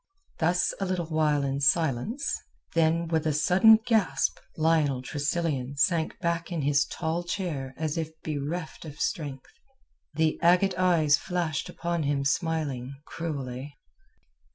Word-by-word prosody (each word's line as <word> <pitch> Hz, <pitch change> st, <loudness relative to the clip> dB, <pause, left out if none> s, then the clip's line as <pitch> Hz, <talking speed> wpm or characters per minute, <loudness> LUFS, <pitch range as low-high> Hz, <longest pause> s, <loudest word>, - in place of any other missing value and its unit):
Thus 175 Hz, +2 st, +2 dB
a 195 Hz, -, -1 dB
little 180 Hz, -2 st, -1 dB
while 155 Hz, -2 st, +1 dB
in 135 Hz, 0 st, -1 dB
silence, 160 Hz, -, +1 dB, 0.4 s
then 165 Hz, +1 st, +2 dB
with 160 Hz, -1 st, 0 dB
a 155 Hz, -, +1 dB
sudden 190 Hz, +8 st, +6 dB
gasp 220 Hz, -7 st, +1 dB, 0.2 s
Lionel 155 Hz, -5 st, +2 dB
Tressilian 145 Hz, -2 st, -2 dB
sank 160 Hz, +2 st, +1 dB
back 170 Hz, 0 st, -2 dB
in 165 Hz, -4 st, -2 dB
his 145 Hz, +1 st, +3 dB
tall 165 Hz, +2 st, -2 dB
chair 165 Hz, -8 st, -4 dB
as 155 Hz, 0 st, -2 dB
if 160 Hz, -1 st, -3 dB
bereft 155 Hz, +3 st, -4 dB
of 150 Hz, -2 st, -10 dB
strength. 140 Hz, -4 st, -3 dB, 0.6 s
The 160 Hz, 0 st, +1 dB
agate 180 Hz, +3 st, +4 dB
eyes 165 Hz, -5 st, +4 dB
flashed 175 Hz, -5 st, -2 dB
upon 170 Hz, -1 st, -2 dB
him 140 Hz, -1 st, 0 dB
smiling, 140 Hz, -4 st, -1 dB
cruelly. 140 Hz, -4 st, -5 dB
160 Hz, 130 wpm, -27 LUFS, 145-170 Hz, 0.6 s, sudden